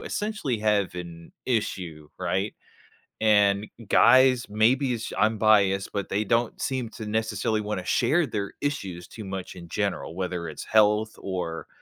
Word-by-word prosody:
essentially 210 - -2
have 105 -3 +1
an 85 -2 -9
issue, 90 - -2
right? 95 +3 -1 0.7
And 105 -1 +4 0.2
guys, 130 0 +5
maybe 125 +6 +2
it's 115 - -4
j - - -7
I'm 110 +2 +2
biased, 100 -3 +3
but 100 -2 -3
they 105 +2 0
don't 115 +2 0
seem 130 -3 -2
to 110 0 -8
necessarily 110 0 -1
wanna 105 -3 -4
share 170 +2 +2
their 105 -6 -4
issues 95 -12 -3
too 110 - -9
much 95 -1 -6
in 85 -2 -11
general, 80 - -2
whether 90 -2 -3
it's 75 - -8
health 110 0 +3
or, 90 -4 -4
105 Hz, 150 wpm, -26 LUFS, 95-115 Hz, 0.7 s, guys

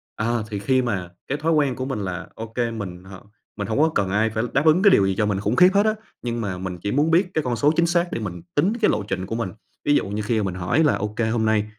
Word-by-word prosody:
à, 115 +2 0
thì 105 -2 -4
khi 130 +5 +2
mà 100 -8 -2 0.2
cái 140 - -1
thói 160 +2 0
quen 145 -5 +2
của 130 - -4
mình 135 -5 -3
là 95 -2 -4
OK, 115 +1 -9 0.2
mình 90 -5 -6
h 95 +1 -12 0.4
mình 100 - -3
hông 110 - -1
có 160 +2 +4
cần 100 -2 +1
ai 105 +3 +2
phải 110 0 -2
đáp 140 +3 +2
ứng 160 +3 +5
cái 205 - +7
điều 100 - +5
gì 95 - 0
cho 105 - +1
mình 100 -2 0
khủng 105 +4 -1
khiếp 180 +7 +7
hết 200 +1 +4
á. 215 0 +2 0.3
Nhưng 120 -1 -3
mà 100 -4 -3
mình 90 -1 -5
chỉ 100 +4 -3
muốn 150 +4 +2
biết 180 +3 +3
cái 155 - 0
con 125 -3 -1
số 145 +6 +3
chính 170 +1 +3
xác 170 +1 +1
để - - -2
mình 90 -5 -5
tính 180 +9 +3
cái 215 - +4
lộ 105 - -1
trình 95 -2 -3
của 110 - -4
mình. 115 -4 -2 0.4
Ví 145 - +4
dụ - - +1
như 105 +1 -2
khi 110 +2 0
mà - - 0
mình 95 -2 -3
hỏi 90 - +1
là 150 - +3
"OK, 105 +2 -5
hôm 110 -1 0
nay, 110 -1 +2
110 Hz, 305 wpm, -23 LUFS, 100-145 Hz, 0.4 s, cái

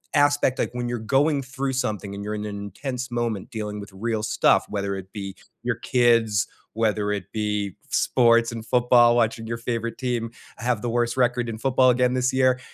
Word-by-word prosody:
aspect, 145 -2 +3
like, - - +1
when 120 0 -3
you're 120 -1 -2
going 140 +6 +2
through 135 0 -3
something 105 -5 -2
and 100 - -6
you're 105 +1 -3
in 105 0 -4
an 105 -1 -5
intense 125 +6 -5
moment 115 -4 -2
dealing 105 -3 -5
with 100 - -10
real 110 +3 -2
stuff, 110 - +3
whether 100 -1 -2
it 95 0 -8
be 100 -2 -6 0.3
your 120 -1 0
kids, 115 -3 +2 0.3
whether 105 -2 0
it 100 -3 -3
be 105 -2 -2
sports 115 -2 +3
and 115 -1 -7
football 120 -1 +5
watching 115 -1 0
your 115 +1 -3
favorite 115 -1 -3
team 120 -3 -2 0.3
have 120 -2 -1
the 120 - -2
worst 120 +1 0
record 120 -1 +1
in 110 - -5
football 130 +1 +3
again 125 0 +3
this 125 0 +1
year. 130 -1 +3
115 Hz, 195 wpm, -24 LUFS, 105-125 Hz, 0.3 s, football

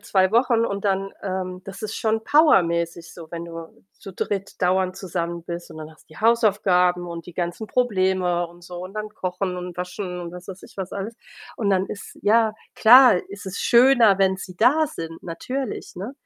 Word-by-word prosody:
2 190 -2 +2
Wochen 235 0 +3
und 200 -2 -3
dann 195 0 0
ähm, 185 -1 -4
das 195 +2 -9
ist 215 0 -4
schon 220 0 0
powermäßig 170 - +3
so, 165 -2 -12
wenn 170 0 -5
du 165 -1 -10 0.2
zu 195 - -10
dritt 195 +1 -4
dauernd 185 +1 +1
zusammen 170 -3 -4
bist, 170 0 -7
und 160 - -10
dann 155 0 -8
hast 155 - -20
du 155 - -16
die - - -13
Hausaufgaben 190 -6 +3
und 170 -1 -7
die 175 - -11
ganzen 175 +5 -3
Probleme 185 -7 +1
und 175 +1 -18
so 175 0 -9
und 190 +3 -10
dann 215 0 -4
Kochen 185 -2 -3
und 180 -1 -7
Waschen 180 0 -5
und, 170 -1 -7
was 180 0 -10
weiß 190 -1 -9
ich, - - -15
was 190 -1 -5
alles. 200 +4 -5 0.4
Und 205 -3 0
dann 190 0 +2
ist 200 - -9
ja, 220 +1 +3 0.2
klar 250 0 +8
ist 200 -1 -10
es 190 +1 -5
schöner, 235 -5 +5
wenn 190 -1 +3
sie 185 -1 -9
da 295 +9 +4
sind, 165 - -7
natürlich, 250 +7 -5
ne? 200 +8 -6
190 Hz, 200 wpm, -23 LUFS, 175-215 Hz, 0.4 s, klar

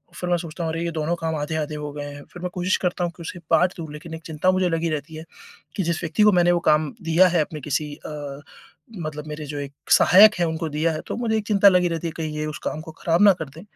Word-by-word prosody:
फ़िर 180 - -4
मैं 175 - +4
सोचता 170 0 -6
हूँ 160 - -1
अरे 165 +1 -2
ये 170 - -2
दोनों 160 +1 -1
काम 160 -1 -1
आधे-आधे 150 0 -3
हो 150 -1 -5
गए 145 -1 -5
हैं 145 0 -10
फ़िर 175 0 -10
मैं 180 - -1
कोशिश 180 +1 +1
करता 180 0 0
हूँ 170 - -3
कि - - -11
उसे 175 +2 -7
बाँट 180 +3 +4
दूँ 160 -3 -7
लेक़िन 160 +2 -9
एक 160 - -11
चिंता 160 +3 +1
मुझे 185 -1 +1
लगी 165 0 0
रहती 155 +1 -4
है 160 - -7 0.5
कि 195 - 0
जिस 170 -1 -2
व्यक्ति 165 +6 +1
को 210 - +7
मैंने 175 0 +4
वो 175 - +2
काम 155 -1 +2
दिया 165 +3 +5
है 170 -2 +2
अपने 150 0 -5
किसी 150 +2 -2
अ, 145 -2 -7 0.6
मतलब 155 -1 -6
मेरे 150 0 -6
जो 145 0 -5
एक 140 0 -6 0.2
सहायक 210 +4 +7
है 170 - +3
उनको 160 0 -3
दिया 155 +3 0
है 155 - -4
तो - - -3
मुझे 225 -2 0
एक 210 - -3
चिंता 205 -1 +5
लगी 180 -1 +3
रहती 165 0 -3
है - - -3
कहीं 155 -2 -4
ये 155 - -2
उस 155 - -5
काम 155 - -3
को 160 -1 -10
ख़राब 170 +3 +1
ना 200 -2 +8
कर 155 -4 -5
दें 155 +5 -12
160 Hz, 285 wpm, -23 LUFS, 150-175 Hz, 0.6 s, ना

